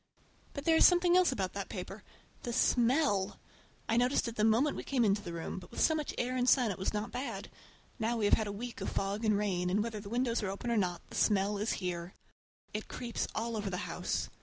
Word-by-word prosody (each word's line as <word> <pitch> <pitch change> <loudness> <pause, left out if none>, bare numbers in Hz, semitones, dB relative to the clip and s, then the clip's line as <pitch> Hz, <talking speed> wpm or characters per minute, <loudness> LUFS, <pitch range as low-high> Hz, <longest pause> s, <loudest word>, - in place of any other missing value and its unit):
But 280 - -5
there 325 -1 +5
is - - +6
something 355 0 +4
else 365 -4 +5
about 195 -7 -2
that 200 -1 -5
paper—the 205 +4 -8
smell! 235 -6 +2 0.5
I 225 - +2
noticed 245 +1 +2
it 230 - -5
the 215 - 0
moment 230 +7 +3
we - - -5
came 255 -4 +1
into 205 0 +2
the 180 -4 -7
room, 170 +2 -5
but 180 - -13
with - - -8
so 315 - +4
much 305 -2 -3
air 250 +1 -1
and 250 0 +2
sun 245 -5 +4
it 190 - -6
was 190 - 0
not 210 +1 -3
bad. 255 +3 -5 0.5
Now 230 +1 0
we 215 - +1
have 205 - +3
had 220 - +3
a - - -3
week 235 +4 -6
of - - -2
fog 200 +3 -2
and 215 -2 +3
rain, 185 -4 0
and 205 +3 +2
whether 225 -2 -4
the 200 -1 -9
windows 240 0 0
are 205 - -2
open 200 +5 -3
or 230 - +2
not, 180 -4 0
the - - -8
smell 205 -1 +2
is 215 +3 0
here. 180 -1 -4 0.6
It 215 +1 -4
creeps 240 -2 -3
all 230 +1 -2
over 210 -2 -2
the 180 -1 -3
house. - - -2
215 Hz, 240 wpm, -32 LUFS, 200-245 Hz, 0.6 s, is